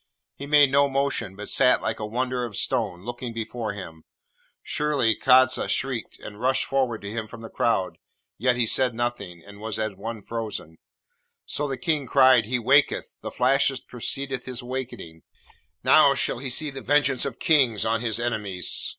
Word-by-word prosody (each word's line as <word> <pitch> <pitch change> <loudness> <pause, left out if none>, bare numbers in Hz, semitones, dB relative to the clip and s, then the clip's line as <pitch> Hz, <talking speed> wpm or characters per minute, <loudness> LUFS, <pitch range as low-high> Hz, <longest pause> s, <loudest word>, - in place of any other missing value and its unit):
He 140 - -9
made 145 -2 +5
no 140 0 +4
motion, 135 -8 -1
but 105 +1 -8
sat 125 0 +4
like 110 - -2
a 105 - -4
wonder 125 +2 -2
of 115 -4 -5
stone, 105 -8 -1
looking 120 0 -6
before 115 -1 -4
him. 85 -5 -9 0.6
Surely, 145 -7 +1
Kadza 130 0 +4
shrieked, 130 -4 -3
and 105 +1 -10
rushed 130 +1 +1
forward 130 -6 -1
to 100 - -5
him 110 -1 -4
from 115 - -11
the 115 - -10
crowd, 95 -6 0 0.4
yet 125 +2 +2
he 120 -1 +1
said 125 +1 +1
nothing, 100 -8 -4
and 100 0 -13
was 110 0 -4
as 110 -1 -2
one 110 +2 -7
frozen. 110 -8 -6 0.7
So 150 - -3
the 135 -2 -4
King 145 +1 -1
cried, 130 -2 +5
'He 125 +2 0
waketh! 135 +5 +2
the - - -5
flashes 135 +1 +2
preceded 135 +1 -4
his 125 -1 -5
wakening! 120 -10 -6 0.6
Now - - +6
shall - - 0
he 135 0 -4
see 145 +4 -2
the 135 0 -8
vengeance 140 -3 +2
of 135 -4 -4
kings 130 -9 +3
on 115 0 0
his 115 -2 -1
enemies.' 105 -6 -1
120 Hz, 175 wpm, -25 LUFS, 110-130 Hz, 0.7 s, Now